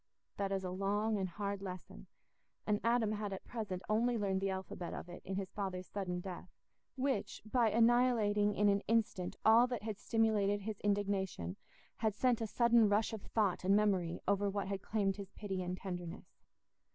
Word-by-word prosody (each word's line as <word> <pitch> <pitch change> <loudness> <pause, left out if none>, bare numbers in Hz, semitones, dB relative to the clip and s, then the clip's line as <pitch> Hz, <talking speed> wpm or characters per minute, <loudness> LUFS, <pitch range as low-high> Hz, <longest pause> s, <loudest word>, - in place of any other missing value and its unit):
That 195 -1 -1
is 195 -1 -1
a 180 - -3
long 205 +3 0
and 190 -1 -1
hard 200 +2 -3
lesson, 185 -2 -8 0.6
and 210 -1 +1
Adam 230 -2 +2
had 210 -1 -3
at 190 - -7
present 200 -6 -4
only 235 +3 +2
learned 195 -3 0
the 195 - 0
alphabet 190 -2 -4
of - - -7
it 175 - -9
in 190 - -4
his 190 -1 -3
father's 190 -2 -4
sudden 180 -3 -3
death, 180 -1 -7 0.5
which, 270 0 -1
by 230 +1 +3
annihilating 225 -3 +3
in 210 - +3
an 200 0 +4
instant 215 -5 +1
all 230 +3 +7
that 245 -4 -4
had 215 -2 -4
stimulated 210 -3 +2
his 210 0 -5
indignation, 195 - -1 0.4
had 220 -2 0
sent 245 0 +2
a 225 - -1
sudden 235 -1 +4
rush 210 +2 +2
of 220 - -5
thought 205 -5 0
and 195 +2 +4
memory 190 -5 +2
over 200 +1 +2
what 200 -1 -2
had 195 -1 -3
claimed 200 -2 0
his 200 -2 -7
pity 195 -3 -4
and 180 0 -3
tenderness. 175 -1 -7
205 Hz, 185 wpm, -35 LUFS, 190-220 Hz, 0.6 s, all